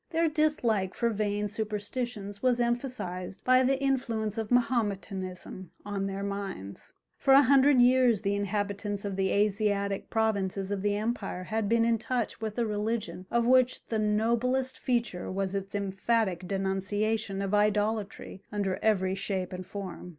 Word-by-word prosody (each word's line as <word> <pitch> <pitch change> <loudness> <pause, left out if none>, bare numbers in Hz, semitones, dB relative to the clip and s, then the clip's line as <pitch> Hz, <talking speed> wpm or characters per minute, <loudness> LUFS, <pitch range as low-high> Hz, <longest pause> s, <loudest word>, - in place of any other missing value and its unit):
Their 330 -1 +2
dislike 245 - +1
for 235 0 +1
vain 210 -1 -1
superstitions 210 0 -4
was 250 -2 +2
emphasized 235 -7 -3
by 255 0 +6
the 265 +1 +2
influence 235 -6 -1
of 220 -2 -3
Mahometanism 195 -7 -1 0.2
on 200 -1 -2
their 195 0 -4
minds. 195 - -5 0.3
For 270 -1 +5
a 280 - +8
hundred 275 0 +5
years 250 -4 +4
the 200 -1 0
inhabitants 205 0 -2
of 200 -1 -3
the 190 0 +1
Asiatic 200 -1 0
provinces 200 -3 0
of 200 -1 -1
the 205 0 +1
empire 210 -4 -3
had 220 +1 -2
been 230 0 +3
in 230 -1 +2
touch 240 -1 -2
with 220 0 -4
a 235 - +1
religion 210 -4 -3
of 235 0 +1
which 255 0 +3
the 220 - 0
noblest 235 +5 +1
feature 235 -8 -1
was 190 0 -2
its 195 0 -4
emphatic 195 -1 0
denunciation 195 +2 -1
of 195 +1 -3
idolatry 210 -1 0
under 200 -2 -1
every 190 -4 +2
shape 190 -2 -2
and 185 0 -6
form. 190 -3 -7
210 Hz, 150 wpm, -29 LUFS, 195-235 Hz, 0.3 s, a